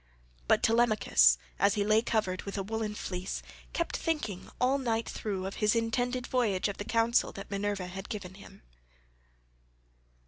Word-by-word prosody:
16 - - -32
But - - +3
Telemachus 215 - +5 0.2
as 200 +1 +4
he 205 - +1
lay 215 +2 +4
covered 215 -5 -1
with 200 0 -6
a 195 - -1
woollen 215 +1 -3
fleece 185 -2 -4 0.3
kept 335 - -2
thinking 295 - -2
all 265 +3 +3
night 230 -3 -1
through 195 -3 -3
of 195 - -5
his 210 +1 +2
intended 245 +2 0
voyage 220 -9 +1
and 200 - -2
of - - -20
the 205 - -4
counsel 230 +1 +3
that 195 +1 -9
Minerva 200 -1 -1
had 190 +2 -7
given 200 -5 -5
him. 195 - -14
210 Hz, 170 wpm, -30 LUFS, 195-230 Hz, 0.3 s, Telemachus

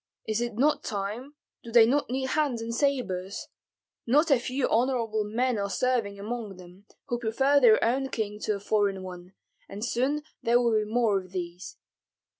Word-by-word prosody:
Is 220 +1 0
it 240 -2 -3
not 290 +6 +2
time, 215 +8 -4 0.3
do 235 - -9
they 230 -1 +7
not 275 +4 +1
need 260 +1 -2
hands 285 -6 0
and 230 +1 -4
sabres? 230 -9 -1 0.6
Not 300 +6 +3
a 270 - +5
few 255 +2 -1
honorable 230 -3 +1
men 230 +2 0
are 200 0 -2
serving 230 -3 0
among 215 -2 -5
them, 185 +3 -15 0.2
who 240 - -2
prefer 265 +5 +2
their 230 -5 +6
own 265 +3 +1
king 210 -4 -3
to 215 - +1
a - - -6
foreign 200 -2 0
one, 180 0 -9 0.4
and 205 +3 -5
soon 265 +5 0 0.2
there 235 +1 +3
will 235 -2 +2
be 215 -1 0
more 225 -4 +2
of 185 0 -13
these. 175 0 -6
230 Hz, 180 wpm, -27 LUFS, 205-255 Hz, 0.6 s, they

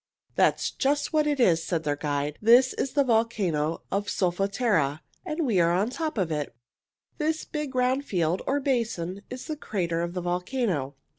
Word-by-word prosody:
"That's - - +2
just 290 +3 0
what 305 -1 +3
it 290 -2 0
is," 170 -9 +4
said 165 -3 -1
their 145 -1 0
guide. 145 0 -2
"This 245 +4 +6
is 270 - -2
the 285 - +4
volcano 205 - 0
of 200 +1 -1
Solfatara, 185 - +1 0.2
and 310 +1 -2
we 220 -8 +2
are 170 0 +4
on 190 +6 +1
the - - -10
top 315 -5 -3
of 180 -5 0
it. 150 -5 -3 0.6
This 315 +1 -1
big 300 -3 -5
round 255 +2 +2
field, 175 - 0
or 280 +2 +2
basin, 225 -9 -1
is 255 0 -7
the 310 - -3
crater 170 - -2
of 170 +1 -3
the 180 - -2
volcano. 180 - -1
200 Hz, 180 wpm, -26 LUFS, 170-260 Hz, 0.6 s, This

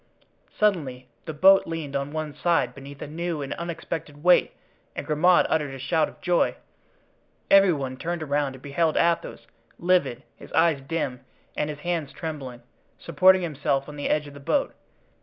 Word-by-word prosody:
Suddenly 140 -12 -1 0.2
the 160 - -4
boat 195 +5 +6
leaned 160 -4 -5
on 140 +1 -2
one 155 -1 -4
side 140 -5 +1
beneath 140 +2 -10
a - - -6
new 165 0 -3
and 135 - -4
unexpected 165 -3 -6
weight 180 0 +5 0.4
and - - -5
Grimaud 165 +4 +4
uttered 150 -4 -1
a - - -7
shout 155 +4 0
of - - -18
joy; 180 -1 +2 1.0
every 195 -1 +7
one 135 -4 -3
turned 170 +2 -3
around 145 -2 -1
and 130 - -15
beheld 155 +3 0
Athos, 170 -8 0 0.3
livid, 175 -8 +1
his - - -14
eyes 165 -4 +3
dim 135 -4 -3 0.3
and 150 - -1
his 145 -1 -7
hands 165 -4 -2
trembling, 135 -7 -6 0.3
supporting 185 0 +4
himself 140 -3 -1
on 150 - -9
the 145 - -3
edge 150 0 +1
of 145 - -11
the 140 - -11
boat. 165 - 0
150 Hz, 170 wpm, -25 LUFS, 140-170 Hz, 1.0 s, every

